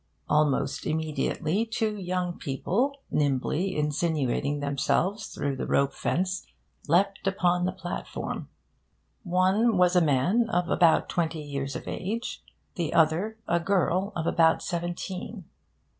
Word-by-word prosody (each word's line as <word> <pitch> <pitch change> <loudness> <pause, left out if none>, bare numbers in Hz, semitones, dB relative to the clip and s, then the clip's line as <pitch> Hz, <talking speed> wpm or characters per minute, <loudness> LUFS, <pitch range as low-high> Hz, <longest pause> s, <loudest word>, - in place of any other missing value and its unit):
Almost 150 -2 +1
immediately, 155 +4 0
two 220 -1 -1
young 180 -2 -3
people, 245 - -1
nimbly 150 +6 0
insinuating 150 -2 0
themselves 145 +9 0
through 140 -1 -3
the - - -3
rope 140 0 +2
fence, 185 +2 -1 0.4
leapt 195 +5 +2
upon 180 -2 +2
the 185 - 0
platform. 180 -1 -5 0.7
One 190 +4 +2
was 180 0 +4
a 180 - +6
man 175 - +2
of 175 -3 0
about 170 -2 +4
twenty 160 -2 -1
years 140 -1 -4
of - - -6
age; 225 +6 -4 0.3
the 165 -3 -2
other, 170 +7 +2
a 170 0 +2
girl 190 +2 +1
of 160 - -2
about 165 -1 +3
seventeen. 180 +3 -4
175 Hz, 125 wpm, -27 LUFS, 155-190 Hz, 0.7 s, a